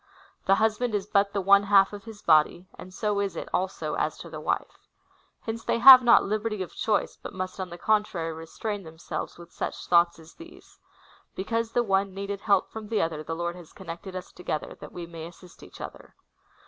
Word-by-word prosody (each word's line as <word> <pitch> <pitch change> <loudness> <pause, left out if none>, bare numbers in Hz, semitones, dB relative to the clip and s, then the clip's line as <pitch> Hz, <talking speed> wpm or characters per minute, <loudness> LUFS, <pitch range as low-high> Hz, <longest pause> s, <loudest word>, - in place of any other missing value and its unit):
'" - - -33
The 195 - +6
husband 220 +2 +1
is 200 -2 -1
but 200 -1 +2
the 200 - -1
one 200 +1 +6
half 200 0 +4
of 205 0 -9
his 220 -2 -11
body, 160 +3 +3
and 185 - -11
so 205 +1 -1
is 200 -3 -2
it, - - -5
also, 185 +1 -2
as - - -1
to - - -10
the - - -6
wife. - - -3 0.5
Hence 225 0 -5
they - - 0
have 255 +2 +11
not 240 -1 +6
liberty 215 -1 -2
of 180 - -11
choice, 215 -2 -1
but - - -8
must 185 +1 -5
on 185 -1 -4
the 175 - -8
contrary 190 -6 0
restrain 200 +6 -5
themselves 160 -1 -7
with 170 0 -14
such - - -5
thoughts 170 0 +4
as 160 0 -15
these: 335 +1 -15 0.3
" - - -29
Because 230 +4 -2
the 240 - +2
one 195 -2 0
needed 200 0 -4
help 200 -3 +2
from 220 -1 -7
the 220 0 0
other, 160 -2 -1
the 165 +1 -4
Lord 170 +1 -3
has 175 -3 -13
connected 170 +3 -8
us 185 - -7
together, 155 -4 -5
that - - -10
we 175 - -7
may 165 -1 -8
assist 175 +1 -16
each - - -13
other." - - -10
195 Hz, 215 wpm, -27 LUFS, 170-215 Hz, 0.5 s, have